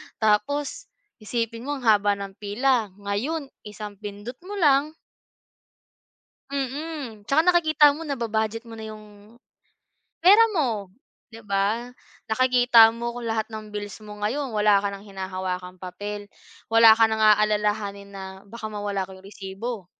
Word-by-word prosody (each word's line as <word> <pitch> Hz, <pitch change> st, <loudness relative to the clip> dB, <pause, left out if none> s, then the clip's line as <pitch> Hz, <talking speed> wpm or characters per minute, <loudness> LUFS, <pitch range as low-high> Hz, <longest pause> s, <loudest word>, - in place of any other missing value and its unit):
Tapos 280 Hz, -, 0 dB, 0.3 s
isipin 230 Hz, +3 st, -3 dB
mo 290 Hz, -, -1 dB
ang 265 Hz, -, -8 dB
haba 205 Hz, -2 st, +4 dB
ng 195 Hz, -1 st, -8 dB
pila, 225 Hz, +2 st, +1 dB
ngayon 250 Hz, +10 st, -3 dB, 0.2 s
isang 210 Hz, -1 st, -8 dB
pindot 210 Hz, +4 st, -8 dB
mo 410 Hz, -, -5 dB
lang 300 Hz, -3 st, +3 dB, 1.6 s
Mm, 275 Hz, -5 st, -5 dB
tsaka 310 Hz, +3 st, +4 dB
nakikita 315 Hz, -4 st, +5 dB
mo, 315 Hz, +3 st, -5 dB
naba-budget 225 Hz, -4 st, -2 dB
mo 225 Hz, -1 st, -10 dB
na 220 Hz, -, -7 dB
'yong 215 Hz, 0 st, -13 dB, 0.8 s
pera 405 Hz, +5 st, +7 dB
mo, 230 Hz, -, -1 dB, 0.4 s
'di 225 Hz, -, -11 dB
ba? 200 Hz, +4 st, 0 dB, 0.4 s
Nakikita 245 Hz, -1 st, +6 dB
mo 235 Hz, +1 st, -5 dB
kung 235 Hz, -2 st, -4 dB
lahat 220 Hz, -1 st, -1 dB
ng 215 Hz, -1 st, -9 dB
bills 205 Hz, 0 st, -7 dB
mo 210 Hz, 0 st, -10 dB
ngayon, 255 Hz, +6 st, -2 dB
wala 210 Hz, -2 st, +3 dB
ka 200 Hz, -, -1 dB
nang 200 Hz, +1 st, -10 dB
hinahawakang 185 Hz, -1 st, -5 dB
papel, 205 Hz, +3 st, -6 dB, 0.4 s
wala 225 Hz, 0 st, +7 dB
ka 225 Hz, -, +6 dB
nang 220 Hz, 0 st, -1 dB
aalalahanin 210 Hz, -1 st, +2 dB
na 195 Hz, -1 st, -8 dB, 0.2 s
baka 220 Hz, +2 st, -8 dB
mawala 205 Hz, -2 st, -3 dB
ko 190 Hz, -, -12 dB
yung 190 Hz, -, -15 dB
resibo. 200 Hz, +1 st, -7 dB
220 Hz, 140 wpm, -24 LUFS, 205-250 Hz, 1.6 s, pera